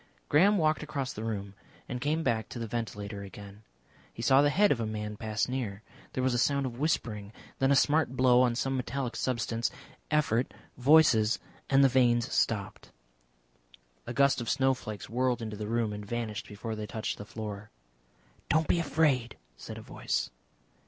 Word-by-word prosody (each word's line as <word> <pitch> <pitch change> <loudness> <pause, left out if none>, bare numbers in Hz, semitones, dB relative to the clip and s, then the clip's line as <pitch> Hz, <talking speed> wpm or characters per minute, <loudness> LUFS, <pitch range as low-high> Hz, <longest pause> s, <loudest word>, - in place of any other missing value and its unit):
Graham 195 +8 +5
walked 155 -3 +2
across 140 -3 -3
the 110 - -6
room 100 -3 -4 0.3
and 125 0 -4
came 155 +4 0
back 110 -5 0
to - - -7
the 115 - -3
ventilator 105 -3 -4
again. 100 +1 -10 0.5
He 115 - -7
saw 135 +3 +6
the 145 - +4
head 205 +7 +4
of 130 - +2
a 115 - -1
man 105 -1 -4
pass 110 0 -1
near. 115 -6 -4 0.3
There 130 - -1
was 130 -1 +2
a 120 - +1
sound 140 +2 +2
of 120 -1 -5
whispering. 110 -9 -1 0.3
Then 135 - +3
a - - +6
smart 145 -2 +2
blow 125 -1 +5
on 125 -2 +2
some 135 +2 -1
metallic 130 0 -3
substance, 115 -2 -1 0.4
effort, 140 -5 +1 0.2
voices, 130 -5 +5 0.3
and 135 0 +5
the - - +8
vanes 120 -2 +2
stopped. 100 -4 -1 1.2
A - - -4
gust 140 -2 +3
of 115 - -4
snowflakes 130 -6 0
whirled 125 +1 0
into 110 -2 -5
the 105 0 -5
room, 115 -1 0
and 105 0 -6
vanished 110 -1 -4
before 110 +2 -5
they 105 -1 -5
touched 110 0 -4
the - - -5
floor. 105 -1 -7 0.8
"Don't 160 0 +2
be 170 - +2
afraid," 145 -7 +1 0.2
said - - -9
a - - -9
voice. - - -2
120 Hz, 180 wpm, -30 LUFS, 110-135 Hz, 1.2 s, the